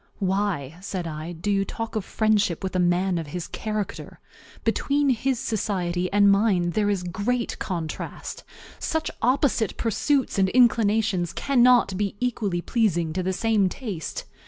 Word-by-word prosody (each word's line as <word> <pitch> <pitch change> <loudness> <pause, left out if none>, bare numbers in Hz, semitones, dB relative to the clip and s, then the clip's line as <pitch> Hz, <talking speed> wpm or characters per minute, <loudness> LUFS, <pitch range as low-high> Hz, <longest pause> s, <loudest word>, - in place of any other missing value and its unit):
"Why," 190 -7 -1
said 190 -3 -4
I, 155 +1 -5
"do 175 +5 -3
you 195 -1 +2
talk 225 +3 -5
of 215 - -1
friendship 205 -5 +1
with 190 -1 -3
a - - +2
man 180 0 +2
of 160 - -5
his 170 +3 -5
character? 215 -2 -5 0.4
Between 285 0 +1
his 255 +2 0
society 185 -6 -1
and 200 0 +5
mine 195 -4 +2
there 205 +2 +1
is 195 -3 0
a - - -5
great 235 +7 -2
contrast. 165 -4 -5 0.4
Such 320 0 -1
opposite 250 -3 +1
pursuits 260 +2 0
and 190 -1 +3
inclinations 215 -6 +3
cannot 250 -6 +4
be 200 -1 -1
equally 215 -8 -1
pleasing 175 -8 0
to 185 - -1
the 185 +1 -1
same 210 -1 +2
taste. 195 - -5
200 Hz, 155 wpm, -25 LUFS, 180-225 Hz, 0.4 s, and